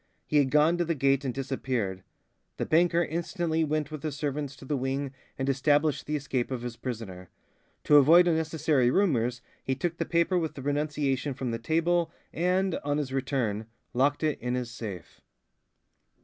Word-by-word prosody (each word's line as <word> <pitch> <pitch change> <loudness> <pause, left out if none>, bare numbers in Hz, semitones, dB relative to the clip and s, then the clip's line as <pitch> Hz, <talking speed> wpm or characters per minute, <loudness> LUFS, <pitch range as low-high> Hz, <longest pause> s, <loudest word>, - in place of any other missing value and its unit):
He 150 - +1
had 140 -2 +4
gone 155 +5 +4
to - - +3
the 165 -1 -1
gate 135 0 +2
and 130 - -1
disappeared. 125 -7 -2 0.6
The - - -1
banker 170 +1 +3
instantly 165 0 -1
went 155 -1 -1
with 155 -2 -6
his 150 -2 -3
servants 145 -2 -3
to 135 - -13
the 145 - -1
wing 135 +1 -2 0.2
and 135 - -2
established 145 +2 +2
the 150 - -1
escape 135 -4 -2
of 125 -3 -4
his 120 -1 -5
prisoner. 105 -8 -6 0.5
To 150 - +6
avoid 165 +5 +7
unnecessary 160 -5 +2
rumours 125 - +1 0.2
he 130 - -1
took 170 +5 -2
the - - -1
paper 170 +2 +2
with 160 -2 -3
the 135 - -7
renunciation 145 -2 -1
from 130 -2 -3
the 115 - -3
table 165 +5 +1 0.2
and, 180 +2 +1
on 145 0 0
his 140 -3 -3
return, 125 -6 -1 0.3
locked 140 +4 +2
it 155 -2 0
in 125 +1 -2
his 125 -2 -3
safe. 100 -9 -8
145 Hz, 175 wpm, -28 LUFS, 130-160 Hz, 0.6 s, avoid